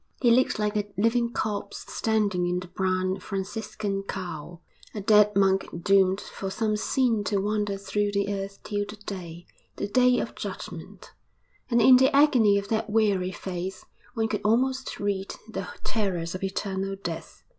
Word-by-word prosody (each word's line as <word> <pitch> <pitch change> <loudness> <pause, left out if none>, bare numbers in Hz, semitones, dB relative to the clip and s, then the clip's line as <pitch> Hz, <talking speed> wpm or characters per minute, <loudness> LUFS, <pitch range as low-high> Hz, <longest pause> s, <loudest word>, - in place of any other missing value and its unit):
He 240 -3 +4
looked 250 0 +3
like 210 0 -1
a 205 -1 -1
living 235 +3 +2
corpse 205 -3 -3
standing 205 -5 +1
in 180 0 0
the 185 - -9
brown 185 +1 0
Franciscan 195 +1 -3
cowl 175 -3 -6 0.3
a 210 - -3
dead 210 0 +5
monk 195 -1 +3 0.2
doomed 195 -1 +4
for 195 - -6
some 215 +2 0
sin 230 0 +1
to 200 +1 +1
wander 205 0 0
through 205 +1 -1
the 200 0 0
earth 195 0 -6
till 205 -1 -1
the 210 - -7
day, 180 -5 -8 0.3
the - - -3
Day 250 +3 +4
of - - -3
Judgment; - - -8 0.6
and 235 -1 +3
in 255 +2 +8
the 260 +1 +5
agony 250 -8 +5
of 200 0 -3
that 220 -1 0
weary 205 -4 +2
face 185 0 -5 0.3
one 225 -1 +1
could 210 -2 -2
almost 260 +4 +1
read 200 -1 -2
the 195 -4 -5 0.2
terrors 180 -6 -1
of 185 - -5
eternal 195 0 -2
death. 175 -4 -7
200 Hz, 165 wpm, -26 LUFS, 190-220 Hz, 0.6 s, in